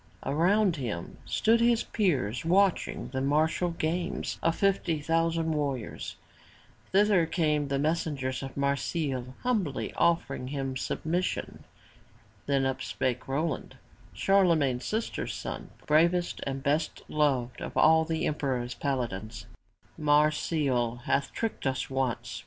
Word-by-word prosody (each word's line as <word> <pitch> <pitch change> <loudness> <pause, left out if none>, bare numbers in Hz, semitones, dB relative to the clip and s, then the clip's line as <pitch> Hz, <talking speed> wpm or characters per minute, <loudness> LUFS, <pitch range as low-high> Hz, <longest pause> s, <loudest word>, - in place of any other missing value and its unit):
Around 180 +4 +3
him 110 -11 -5
stood 230 +1 +3
his 235 -1 +3
peers 130 - 0
watching 190 +3 +2
the 130 0 -3
martial 155 +5 +2
games 170 +1 -2
of 165 0 +2
fifty 190 -5 +1
thousand 165 +1 +1
warriors. 140 -6 -3 0.8
Thither 195 -4 +4
came 150 -4 +1
the 140 0 0
messengers 145 -3 -1
of 135 0 -7
Marsile, 140 -2 -1
humbly 210 - -1
offering 150 -6 +1
him 135 -1 -3
submission. 170 +7 -2 0.8
Then 140 -1 +2
up 130 0 -1
spake 130 -1 -2
Roland, 145 +2 -2 0.4
Charlemagne's 160 - +3
sister's 220 +1 -2
son, - - -6 0.2
bravest 170 +3 +2
and 135 0 -3
best 150 +3 0
beloved 130 -5 0
of - - -5
all 160 +1 +6
the 160 0 -1
emperor's 130 -5 -1
paladins: 120 -4 -3 0.5
"Marsile 145 -5 +2
hath 140 0 0
tricked 225 -10 -3
us 130 0 -2
once. 130 -3 -2
150 Hz, 120 wpm, -29 LUFS, 130-170 Hz, 0.8 s, all